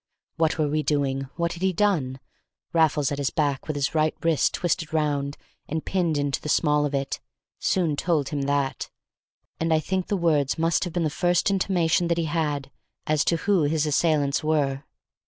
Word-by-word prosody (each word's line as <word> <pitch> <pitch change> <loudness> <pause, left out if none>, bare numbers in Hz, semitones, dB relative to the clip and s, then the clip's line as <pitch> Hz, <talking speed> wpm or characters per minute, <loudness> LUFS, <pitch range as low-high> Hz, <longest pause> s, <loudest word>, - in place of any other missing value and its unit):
What 160 -1 +1
were 155 -2 +1
we 155 +1 0
doing? 135 -3 0
What 170 0 -1
had 175 - -10
he 190 0 +2
done? 160 -10 +1 0.5
Raffles 155 -3 +2
at 145 - -3
his 140 - 0
back, 145 -4 -1
with 155 - -2
his 145 +1 -1
right 155 -1 +1
wrist 165 -3 +2
twisted 170 -2 -1
round 145 -2 -1 0.3
and 160 +1 -3
pinned 175 -5 0
into 145 -1 -1
the 150 - -5
small 150 -1 +3
of 140 - -3
it, 135 0 -2 0.4
soon 170 -5 +1
told 150 -3 0
him 145 -2 -2
that, 140 -1 -1 0.7
and 165 0 0
I 160 - +4
think 185 +4 -2
the 205 - 0
words 150 -6 +1
must 165 +3 +1
have 175 - -6
been 175 -1 0
the 155 - 0
first 175 +4 +1
intimation 175 -3 +1
that 170 0 +1
he 165 - 0
had 150 -4 -2 0.3
as 155 -1 +2
to 170 - +2
who 200 -4 +3
his 155 +1 +1
assailants 150 -2 +1
were. 140 -3 0
155 Hz, 190 wpm, -25 LUFS, 145-170 Hz, 0.7 s, I